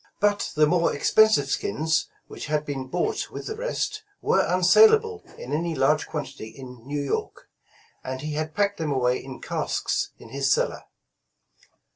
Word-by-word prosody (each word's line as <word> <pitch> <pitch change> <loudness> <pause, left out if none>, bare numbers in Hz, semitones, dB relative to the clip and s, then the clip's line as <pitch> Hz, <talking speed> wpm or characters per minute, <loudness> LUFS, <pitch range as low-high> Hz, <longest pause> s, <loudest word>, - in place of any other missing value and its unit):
But 205 -1 +1
the 155 0 +5
more 170 +2 +2
expensive 215 -1 +4
skins, 160 +2 0 0.2
which - - -8
had 150 0 0
been 135 -3 -4
bought 430 - -1
with - - -7
the 440 - -4
rest, 435 -3 -2 0.2
were 190 - +2
unsalable 440 - +5
in 130 - -6
any 165 +2 -1
large 140 +3 +2
quantity 140 -7 -6
in 125 0 -11
New 145 0 -2
York, 140 - -3 0.6
and 130 0 -4
he 155 +2 -4
had 155 +1 -3
packed 200 0 +1
them 155 -2 -1
away 125 -2 +1
in 130 -1 -9
casks - - -1
in - - -14
his 135 0 0
cellar. - - 0
155 Hz, 160 wpm, -25 LUFS, 135-205 Hz, 0.6 s, the